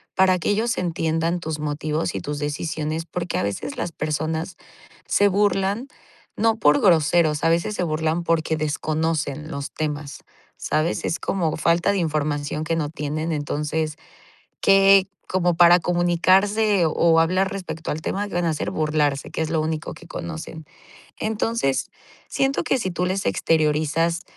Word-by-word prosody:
para 185 -1 +4
que - - -1
ellos 225 +4 +1
entiendan 165 0 -1
tus 160 -2 -4
motivos 150 +2 -2
y - - -1
tus 145 0 -4
decisiones, 155 +2 -3
porque 175 +1 -3
a - - 0
veces 100 +7 -4
las 170 - -3
personas 160 +3 -3 0.5
se 205 - +4
burlan, 200 +4 +1 0.5
no 225 +1 +2
por 150 -8 +4
groseros, 160 -3 +3
a 165 - +4
veces, 170 +5 0
se 180 - -1
burlan 160 +1 -1
porque 160 -1 0
desconocen 155 0 -2
los 140 -2 -5
temas, 150 -2 -4 0.3
¿sabes?, 155 +2 -1
es 170 - -1
como 170 -5 -1
falta 170 +4 +2
de 200 - 0
información 150 -2 -1
que 165 +1 -1
no 155 -3 -1
tienen. 155 +2 -3
Entonces, 150 +1 -2 0.6
que 195 -1 +6 0.2
como 175 -2 +1
para 175 +1 +7
comunicarse 185 +4 +2
o 165 +1 +3
hablar 185 +4 +2
respecto 165 -4 -5
al 155 - -4
tema, 200 +5 -2
¿qué - - -7
van 175 0 +1
a 165 - +2
hacer?, 155 - -3
burlarse, 150 -3 0
que - - -3
es 160 - -1
lo 160 0 0
único 155 0 -3
que 170 - -14
conocen. 165 -1 -7 0.6
Entonces, 220 -9 -1 0.4
siento 270 0 0
que - - +1
si 190 -6 -2
tú 180 +1 -1
les 190 +2 -1
exteriorizas, 160 +2 +1
165 Hz, 160 wpm, -23 LUFS, 155-180 Hz, 0.6 s, para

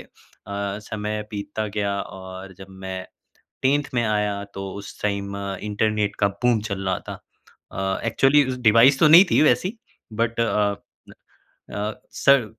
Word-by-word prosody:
अ, - - -14 0.4
समय 105 +1 -4
बीतता 105 +1 -4
गया 100 -1 -1
और 95 0 -9
जब 95 - -10 0.2
मैं 95 0 -4 0.6
10th 140 +2 +3
में 120 - +2
आया 105 -2 0
तो 95 0 -5
उस 100 0 -9
टाइम 100 -1 -2 0.3
इंटरनेट 105 0 0
का 100 - +4
बूम 115 +3 +1
चल 95 0 -3
रहा 95 - 0
था। - - -4 0.6
अ, 95 0 -2
एक्चुअली 135 +5 +4 0.2
डिवाइस 115 +5 +6
तो 155 - +7
नहीं 170 +5 +10
थी - - +4
वैसी 185 +8 +2 0.3
बट 115 +1 -1
अ 105 -2 +1 1.0
अ, 105 +1 -2 0.2
सर 140 -4 +4
105 Hz, 145 wpm, -23 LUFS, 100-115 Hz, 1.0 s, नहीं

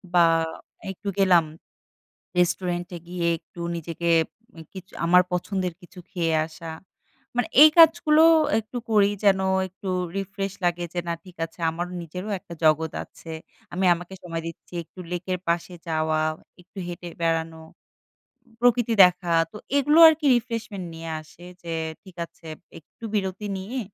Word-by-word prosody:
বা 175 - +7 0.7
একটু 195 +2 -10
গেলাম, 180 -4 +5 1.0
রেস্টুরেন্ট 175 0 0
এ - - -11
গিয়ে 175 -1 -2
একটু 175 - -17 0.2
নিজেকে 170 +1 -3 0.5
উম 165 - -10
কিছু 190 0 -11
আমার 180 +2 +6
পছন্দের 180 0 -2
কিছু 180 +1 -14
খেয়ে 170 -4 0
আসা। 165 +1 -10 0.7
মানে 245 -1 +1
এই 310 - +11
কাজগুলো 320 -1 +6 0.4
একটু 220 +3 -8
করি, 205 -2 +5 0.2
যেন 195 -1 +5 0.3
একটু 190 +1 -8 0.3
রিফ্রেশ 195 0 -3
লাগে 175 0 0
যে, 175 - -1
"না, - - 0
ঠিক 180 -2 -14
আছে, 165 - -18
আমার 175 +2 -4
নিজেরও 180 +5 -7
একটা 170 - -11
জগৎ 155 0 +3
আছে। 165 - -15 0.4
আমি 185 +2 0
আমাকে 175 +2 -10
সময় 165 -2 -4
দিচ্ছি।" 165 +2 -11
একটু 185 - -18
লেকের 180 +1 -2
পাশে 170 +1 -1 0.2
যাওয়া, 155 -1 0 0.4
একটু 185 +3 -22
হেঁটে 175 0 -7
বেড়ানো, 165 -1 -1 1.0
প্রকৃতি 240 -1 +3
দেখা। 180 -1 +2 0.2
তো, - - -16 0.2
এগুলো 295 +3 +3
আরকি 315 -1 +2
রিফ্রেশমেন্ট 225 -5 -5
নিয়ে 165 0 -7
আসে। 160 +3 -17 0.2
যে, 165 -1 -4 0.3
ঠিক 190 -3 -15
আছে, 165 - -24 0.3
একটু 160 - -25
বিরতি 195 +1 -2
নিয়ে 230 +8 -5
180 Hz, 145 wpm, -24 LUFS, 170-200 Hz, 1.0 s, এই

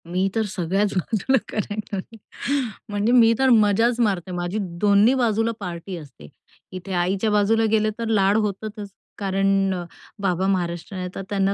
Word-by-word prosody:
मी 185 +3 0
तर 225 - +2
सगळ्याच 195 +3 0
बाजूला 225 +8 +1
करायची. 210 0 -5 0.7
म्हणजे 205 +2 0
मी 230 -2 +6
तर 265 0 +4
मजाच 225 +1 +4
मारते. 195 -6 0
माझी 175 +2 -3 0.2
दोन्ही 205 +3 +5
बाजूला 230 -2 +1
पार्टी 180 -1 -6
असते. 140 - -12 0.4
इथे 185 +1 -6
आईच्या 185 +4 0
बाजूला 210 +2 +3
गेले, 215 -1 +3
तर 230 - -2
लाड 205 -2 +3
होतातच. 210 0 -3 0.3
कारण 195 0 +1
अ, 180 -1 -4 0.4
बाबा 185 -1 0
महाराष्ट्रीयन 180 0 -2
आहेत. 180 0 -5
तर - - -4
त्यांना 195 -1 +1
200 Hz, 150 wpm, -23 LUFS, 185-220 Hz, 0.7 s, मी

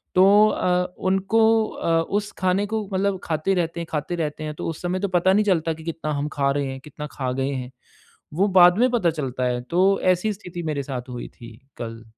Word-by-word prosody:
तो 200 +3 +6
अ, 180 -1 0
उनको 195 +4 +2 0.3
अ, 165 -4 0
उस 205 +5 -2
खाने 185 +2 +1
को 220 0 -2
मतलब 195 0 0
खाते 160 +4 0
रहते 170 -1 -1
हैं 170 - -5
खाते 155 +3 -2
रहते 155 -2 -3
हैं 155 0 -4
तो - - -5
उस 165 - -6
समय 180 +1 -1
तो 200 - -1
पता 185 0 +2
नहीं 210 +2 +3
चलता 165 -5 +1
कि 160 0 -12
कितना 160 -2 -4
हम 145 +1 -2
खा 140 -1 +1
रहे 140 0 -1
हैं, 135 - -7
कितना 150 0 -8
खा 130 -2 -3
गए 135 - 0
हैं, 130 -2 -5 0.6
वो 190 +6 +2
बाद 175 +1 +7
में 250 +1 +4
पता 225 -8 +2
चलता 135 -5 -4
है, 125 -1 -1
तो 185 +9 +2
ऐसी 185 +4 +2
स्थिति 180 -3 -8
मेरे 150 -3 -2
साथ 130 -2 -6
हुई 120 -1 -6
थी 115 -2 -12 0.2
कल। 115 -1 -7
170 Hz, 220 wpm, -23 LUFS, 145-190 Hz, 0.6 s, बाद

